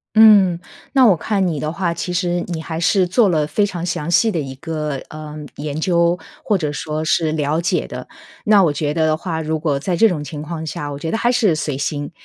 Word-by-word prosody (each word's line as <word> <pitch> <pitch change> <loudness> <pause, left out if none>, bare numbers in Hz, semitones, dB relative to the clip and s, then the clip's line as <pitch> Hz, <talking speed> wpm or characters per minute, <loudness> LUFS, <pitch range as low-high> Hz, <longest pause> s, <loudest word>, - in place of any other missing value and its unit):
嗯。 205 -6 +7 0.3
那 265 -3 +6
我 195 -6 +5
看 195 +2 0
你 155 -5 -2
的 155 +1 -2
话， 170 -2 -1
其 180 +2 -4
实 175 0 0
你 165 -2 -3
还 160 0 -5
是 185 +2 +3
做 205 +4 +3
了 155 -4 +1
非 180 +8 +1
常 175 -4 -3
详 165 -1 -2
细 225 +5 +4
的 170 - -1
一 135 -2 -6
个， 150 -1 -3
呃， 155 0 -8 0.2
研 145 0 -4
究， 170 0 +2 0.2
或 205 -3 +1
者 150 -3 -2
说 155 +1 -3
是 160 0 +1
了 155 +1 0
解 170 - 0
的。 - - -8 0.4
那 210 -2 +5
我 155 - +2
觉 145 0 -2
得 160 0 +1
的 155 0 +2
话， 160 -1 -4
如 160 0 -2
果 145 -4 0
在 175 +5 -2
这 225 +5 +5
种 155 -6 -3
情 145 +1 -7
况 160 +1 -5
下， 145 -1 -4
我 140 - -6
觉 160 +2 -4
得 - - 0
还 240 - +2
是 230 -8 +3
随 150 -3 -3
心。 145 +1 -3
165 Hz, 255 characters per minute, -19 LUFS, 150-180 Hz, 0.4 s, 嗯